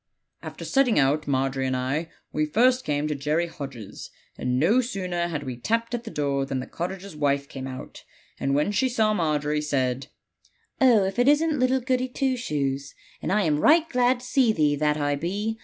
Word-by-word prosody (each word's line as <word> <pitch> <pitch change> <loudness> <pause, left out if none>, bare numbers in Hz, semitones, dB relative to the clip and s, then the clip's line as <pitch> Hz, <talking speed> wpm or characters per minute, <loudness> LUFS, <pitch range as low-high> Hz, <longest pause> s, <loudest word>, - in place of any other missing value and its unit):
"After - - -8
setting 270 -4 +2
out, 145 +2 +2
Margery 135 -1 0
and 130 0 0
I, 140 +6 -2 0.2
we 155 0 0
first 250 +10 +3
came 145 0 0
to 150 - -1
Jerry 150 +4 0
Hodge's; 135 - -8 0.3
and 125 0 -1
no 210 - +4
sooner 185 -7 -2
had 150 -4 -4
we 130 -3 -5
tapped 230 - -1
at 240 0 -3
the - - -5
door 140 -5 -1
than 135 -1 -3
the 130 - -5
cottager's 185 +1 -6
wife 140 -1 0
came 135 -1 -7
out, 130 0 -9 0.4
and 135 0 0
when 150 +7 +1
she 260 +5 +1
saw 220 -3 +2
Margery, 150 -4 0
said, 135 -2 -1 0.7
'Oh, 240 -6 +6
if 190 +4 -2
it 245 - +3
isn't 300 0 +3
little 255 +1 +2
Goody 255 0 0
Two 260 +1 -1
Shoes; 140 - -3 0.3
and - - -2
I 210 +1 +3
am 150 -3 +1
right 320 - +5
glad 250 -3 +2
to - - -10
see 255 -2 +3
thee, 150 -7 +2
that 150 +1 +1
I 145 -1 0
be! 200 +9 -3
160 Hz, 200 wpm, -25 LUFS, 140-235 Hz, 0.7 s, Oh